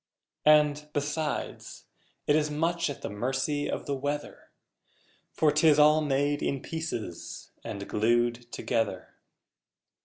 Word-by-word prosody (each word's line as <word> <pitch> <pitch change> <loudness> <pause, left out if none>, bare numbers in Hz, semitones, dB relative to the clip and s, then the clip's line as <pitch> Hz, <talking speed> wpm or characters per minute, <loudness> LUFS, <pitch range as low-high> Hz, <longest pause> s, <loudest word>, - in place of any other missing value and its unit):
And, 150 0 +4
besides, 150 +2 -3 0.4
it 145 - +3
is 150 -1 +2
much 165 +2 0
at 140 - -7
the - - -3
mercy 135 +7 -1
of - - -3
the 140 - -2
weather 145 +2 -4 0.8
For 155 -2 +3
'tis 150 0 +5
all 150 +1 +6
made 145 0 +1
in 135 -2 -2
pieces 160 - -5
and 100 0 -6
glued 120 +2 +1
together! 105 -5 -2
145 Hz, 120 wpm, -28 LUFS, 120-150 Hz, 0.8 s, all